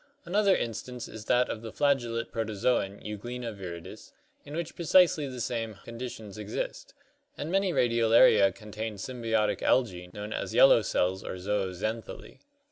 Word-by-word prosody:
5). - - -24
Another 200 +1 +4
42 - - +4
ORGANIC - - 0
EVOLUTION 125 +3 -7
instance 120 - -6
is 110 -1 -8
that 125 +2 +3
of 110 - -5
the 115 -1 -7
flagellate 120 -5 0
protozoon 110 -2 -1
Euglena 115 +3 -5
viridis 85 -4 -9 0.3
in 145 - -8
which 170 0 -4
precisely 170 -3 +4
the 130 -2 -7
same 115 -2 -3
conditions 115 -3 -7
exist, 105 0 -5 0.4
and 150 +3 -4
many 195 0 +2
Radiolaria 115 - +5
contain 110 0 -6
symbiotic 115 -1 -1
algae 90 -8 +1
known 105 +3 -6
as - - -4
"yellow - - +7
cells" 95 +1 0
or - - -5
zooxanthellae. 100 +3 -3
115 Hz, 155 wpm, -29 LUFS, 105-125 Hz, 0.4 s, yellow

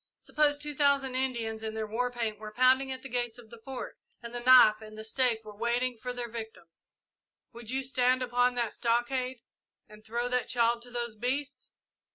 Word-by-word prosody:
Suppose 295 -1 +1
two 295 0 -3
thousand 280 -2 +2
Indians 235 -4 -2
in 220 0 -5
their 220 0 -2
war 235 +4 -1
paint 230 -4 -3
were 215 0 -8
pounding 260 +3 +3
at 260 - -6
the - - -6
gates 240 -2 -2
of 230 -3 -15
the 235 - -11
Fort, 265 -1 -7 0.2
and 235 0 -7
the 240 - -2
knife 240 -3 +7
and 215 0 -11
the 220 - -7
stake 225 -1 +1
were 210 -1 -10
waiting 240 +3 0
for 250 +2 -5
their 245 -1 -4
victims 220 -7 -10 0.6
would 235 -1 -9
you 265 +1 -1
stand 255 -1 +2
upon 245 0 +2
the 235 -3 -1
stockade 245 +1 -1 0.5
and 215 0 -15
throw 235 +2 -2
that 250 0 0
child 235 -1 +2
to 245 - -11
those 240 -2 -4
beasts? 265 +4 -3
245 Hz, 200 wpm, -29 LUFS, 225-255 Hz, 0.6 s, knife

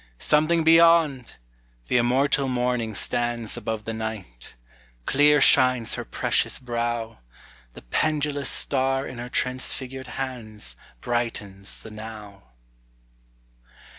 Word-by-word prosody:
Something 155 - +2
beyond! 165 -5 +4 0.5
The - - +2
immortal 135 +3 +2
morning 125 -3 -1
stands 120 +1 -1
Above 110 -2 -4
the 115 - -4
night; 110 - -7 0.5
clear 150 +1 +4
shines 125 -4 +4
her - - -3
precious - - 0
brow; 120 - -3 0.6
The - - -12
pendulous 145 - 0
star 135 0 +1
in 125 - -8
her 120 +1 -6
transfigured 130 +1 -2
hands 115 - -5 0.3
Brightens 105 -5 -4
the 110 - -11
Now. 105 - -10
120 Hz, 105 wpm, -24 LUFS, 110-135 Hz, 0.6 s, beyond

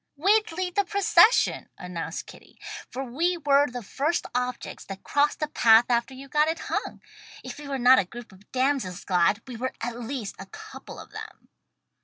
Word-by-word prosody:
"We'd 410 +7 +3
lead 360 +2 -3
the 405 - +2
procession," 400 +1 +4
announced 170 -2 -5
Kitty, - - -16 0.3
"for 265 - -5
we 330 +8 0
were 285 -2 +3
the 245 -1 -6
first 295 - -1
objects 250 0 -3
that 195 -1 -9
crossed 290 +2 +1
the 305 - -1
path 230 -5 +5
after 240 +2 0
you 270 +1 -10
got 300 +3 +2
it 325 +1 -1
hung. - - -3 0.4
If 255 +1 -8
we 295 - -9
were 275 -1 -2
not 255 +1 +6
'a 195 - 0
group 235 +5 -11
of 190 +2 -20
damsels 255 -8 -1
glad' 185 +4 +2
we 245 -3 -7
were 255 +3 -3
at 235 +1 -4
least 240 -3 -5
a 195 - -8
couple 435 - -11
of - - -12
them." - - -10
260 Hz, 190 wpm, -26 LUFS, 230-305 Hz, 0.4 s, not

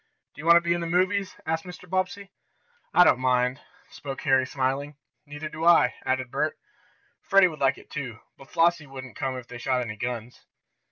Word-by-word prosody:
"Do - - -10
you 160 - -6
want 170 - +8
to - - +3
be 170 0 +1
in 175 - -2
the 170 - -3
movies?" 185 +3 +1
asked 160 0 -1
Mr. 180 0 -11
Bobbsey. 190 +2 -2 0.6
"I 180 - +7
don't 130 - +4
mind," 125 +1 +1 0.3
spoke 135 -1 -7
Harry, 135 -3 +3
smiling. 135 +2 -2 0.3
"Neither 145 +2 -6
do 155 +1 -7
I," 165 -7 +5
added 130 -1 -1
Bert. - - -1 0.6
"Freddie 195 -1 +5
would 155 -3 -10
like 135 -1 +2
it, - - -17
too, 125 -7 -5 0.2
but 135 - -16
Flossie 165 -2 +2
wouldn't 130 -3 -9
come 130 -1 -3
if 125 -1 -9
they 120 - -9
shot 130 +1 0
any 110 -3 -5
guns." 125 0 -5
140 Hz, 200 wpm, -26 LUFS, 130-170 Hz, 0.6 s, want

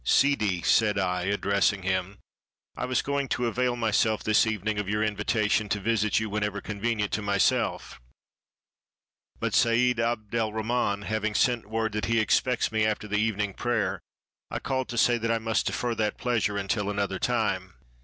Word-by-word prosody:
"Sidi," 105 - +2
said 105 -2 +3
I, 90 -2 0
addressing 100 0 +1
him, 95 +1 -1 0.6
"I - - -3
was 130 0 0
going 140 -1 -1
to 125 - -1
avail 125 +1 0
myself 110 -1 +1
this 110 +1 +3
evening 110 -1 -1
of 100 -2 -3
your 105 +1 0
invitation 105 0 0
to 100 - 0
visit 110 +1 +1
you 110 - -2
when 105 +1 -2
ever 105 -1 -2
convenient 105 0 -2
to 110 - -1
myself; 100 -9 0 1.4
but - - -2
Seid 120 +1 +3
Abd' 115 -2 -2
el 115 -2 0
Rahman 110 -2 -1
having 110 0 -2
sent 120 -4 +1
word 110 0 -1
that 105 0 -2
he 115 0 +2
expects 120 +3 +1
me 110 -1 +1
after 110 0 -1
the 105 0 0
evening 105 -2 0
prayer, 105 -6 -1 0.5
I - - -3
called 130 -1 -2
to 120 - -5
say 120 +1 +3
that 115 0 -2
I 115 - +2
must 110 -2 -1
defer 120 -1 -1
that 110 -2 -1
pleasure 110 -4 0
until 100 +1 -1
another 100 -2 -2
time." 95 -7 -1
110 Hz, 175 wpm, -27 LUFS, 100-115 Hz, 1.4 s, said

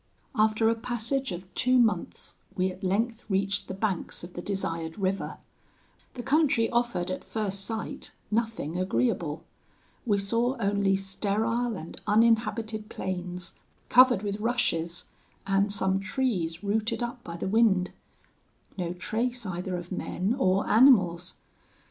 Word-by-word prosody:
"'After 215 -1 +3
a 225 - +4
passage 240 +2 -1
of 180 +2 -7
two 255 0 +3
months, 230 -3 0 0.2
we 185 -1 +1
at 185 +2 -12
length 225 +5 0
reached 195 +1 0
the 190 - -5
banks 195 -5 -2
of 175 +1 -9
the 175 - -5
desired 165 -4 -3
river. 195 -1 -1 0.8
The 245 - -5
country 265 -4 +3
offered 235 -7 0
at 185 - -4
first 200 -3 -2
sight 225 -1 -5 0.2
nothing 215 -7 -1
agreeable. 150 0 0 0.6
We 205 -2 +3
saw 230 +6 +1
only 200 -2 +2
sterile 215 +5 -1
and 165 - -9
uninhabited 220 0 +2
plains, 180 -1 -5 0.4
covered 250 -4 +6
with 205 0 -2
rushes, 175 -8 0 0.4
and 195 +1 +2
some 190 -1 +1
trees 190 -6 -1
rooted 220 +3 0
up 240 0 -5
by 170 0 -7
the 170 - -3
wind. 195 -3 +3 0.9
No 175 -1 -1
trace 235 +6 -2
either 180 0 -3
of 175 +1 -8
men 185 +2 -1
or 190 -3 +2
animals. 190 -8 +5
200 Hz, 135 wpm, -28 LUFS, 185-230 Hz, 0.9 s, covered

